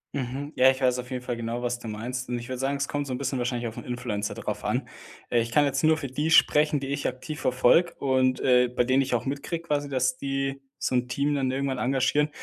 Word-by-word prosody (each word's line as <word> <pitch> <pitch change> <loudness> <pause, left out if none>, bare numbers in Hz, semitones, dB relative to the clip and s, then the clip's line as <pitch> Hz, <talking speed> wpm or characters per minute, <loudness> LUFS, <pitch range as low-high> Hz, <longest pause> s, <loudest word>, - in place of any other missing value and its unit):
Mhm. 140 +3 -4
Ja, 130 +1 +6
ich 130 0 0
weiß 125 -1 +2
auf 125 - -6
jeden 125 -1 -4
Fall 125 - -3
genau, 115 +1 -4
was 120 0 -1
du 120 - -9
meinst 120 +4 -4
und 125 - -1
ich 120 - -7
würde 130 -1 -5
sagen, 135 +2 0
es 140 0 -1
kommt 145 -1 -3
so 130 - -3
'n - - -2
bisschen 130 0 -2
wahrscheinlich 120 -1 -1
auf 110 - -8
'n - - -6
Influencer 120 -4 -3
drauf - - -4
an. - - -1 0.4
Äh, 120 - +4
ich 115 0 -4
kann 150 +2 +4
jetzt 135 +1 -1
nur 155 0 +5
für 155 - -5
die 150 +5 -2
sprechen, 150 -2 +5
die 135 0 -5
ich 140 0 -1
aktiv 130 +4 -5
verfolge 130 +7 +3
und, 130 -2 +2
äh, 125 -1 +4
bei 125 0 0
denen 130 +2 +3
ich 135 -2 0
auch 115 - -2
mitkriege 145 +5 -3
quasi, 145 -3 -1
dass 130 -1 +1
die 135 0 -2 0.2
so - - -2
'n 125 0 +1
Team 140 +3 0
dann 135 -2 0
irgendwann 135 -1 -1
engagieren. 135 +3 +2
130 Hz, 260 wpm, -26 LUFS, 125-140 Hz, 0.4 s, Ja